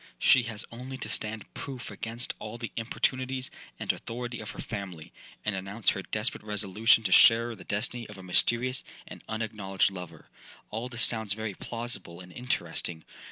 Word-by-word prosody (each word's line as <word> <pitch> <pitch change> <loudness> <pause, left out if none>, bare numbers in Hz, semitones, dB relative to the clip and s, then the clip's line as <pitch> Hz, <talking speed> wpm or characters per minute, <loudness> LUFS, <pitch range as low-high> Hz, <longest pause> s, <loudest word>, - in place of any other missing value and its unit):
She 135 - +6
has 110 -2 -6
only 130 +3 -6
to 130 - -5
stand 110 -1 -1
proof 130 -3 -6
against 115 +2 -1
all 110 +2 -6
the 115 -1 -5
importunities 130 +3 0 0.3
and - - +1
authority 120 +1 -5
of 105 - -6
her - - -8
family, 95 -7 -6 0.3
and 105 -2 +1
announce 100 +3 0
her 95 - -3
desperate 105 +4 -1
resolution 105 +2 +4
to 95 - 0
share 115 +3 +7
the - - -11
destiny 115 +3 0
of 105 - -9
a 95 - -10
mysterious 120 +7 +3 0.2
and - - -10
unacknowledged 105 -4 0
lover. 90 -2 -9 0.4
All 115 +4 -3
this 120 -3 +2
sounds 110 -3 +3
very 110 -1 -3
plausible 110 -6 -4
and 90 -1 -11
interesting. 85 - -1
110 Hz, 165 wpm, -29 LUFS, 100-120 Hz, 0.4 s, share